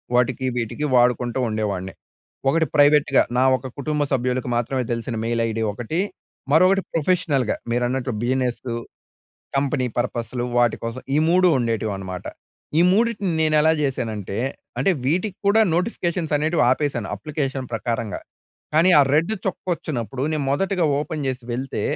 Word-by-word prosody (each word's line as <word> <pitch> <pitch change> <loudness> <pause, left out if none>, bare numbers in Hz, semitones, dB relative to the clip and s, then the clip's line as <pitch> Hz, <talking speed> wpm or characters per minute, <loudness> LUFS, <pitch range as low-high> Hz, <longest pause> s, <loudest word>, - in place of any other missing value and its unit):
వాటికి 125 +1 +1
వీటికి 120 +5 -2
వాడుకుంటూ 125 0 +2
ఉండేవాడిని. 100 -3 -2 0.6
ఒకటి 165 +2 +2
ప్రైవేట్‌గా 145 -1 +5
నా 130 - +4
ఒక 130 +1 -8
కుటుంబ 150 +1 -1
సభ్యులకు 125 0 0
మాత్రమే 125 +2 0
తెలిసిన 115 +1 -4
మెయిల్ 115 0 0
ఐడీ 115 0 -2
ఒకటి. 120 - -3 0.5
మరొకటి 185 +4 +5
ప్రొఫెషనల్‌గా 150 -7 +1 0.2
మీరన్నట్లు 125 +1 0
బిజినెస్ 125 -1 0 0.9
కంపెనీ 135 -2 +1
పర్పస్‌లు 120 0 -2
వాటి 120 -2 +3
కోసం 115 +2 -4
ఈ - - +3
3 180 +1 +5
ఉండేటివి 115 -3 -1
అనమాట. 95 -1 -7 0.5
ఈ - - +6
మూడిటిని 205 -2 +1
నేను 155 -1 +2
ఎలా 160 +1 +4
చేశానంటే, 110 -8 -3 0.4
అంటే 195 - +3 0.2
వీటికి 185 +7 0
కూడా 205 +2 +5
నోటిఫికేషన్స్ 175 -4 -1
అనేటివి 155 +1 +1
ఆపేసాను. 130 -6 -1
అప్లికేషన్ 135 +1 -3
ప్రకారంగా. 115 -1 -2 0.5
కానీ 170 +4 +5
ఆ - - +8
రెడ్ 165 +7 +2
చుక్క 190 - -3
వచ్చినప్పుడు 130 -4 -4
నేను 150 -2 -1
మొదటిగా 185 +4 +1
ఓపెన్ 150 -1 -3
చేసి 130 -2 -3
వెళ్తే, 125 -3 -3
130 Hz, 135 wpm, -22 LUFS, 120-155 Hz, 0.9 s, ఆ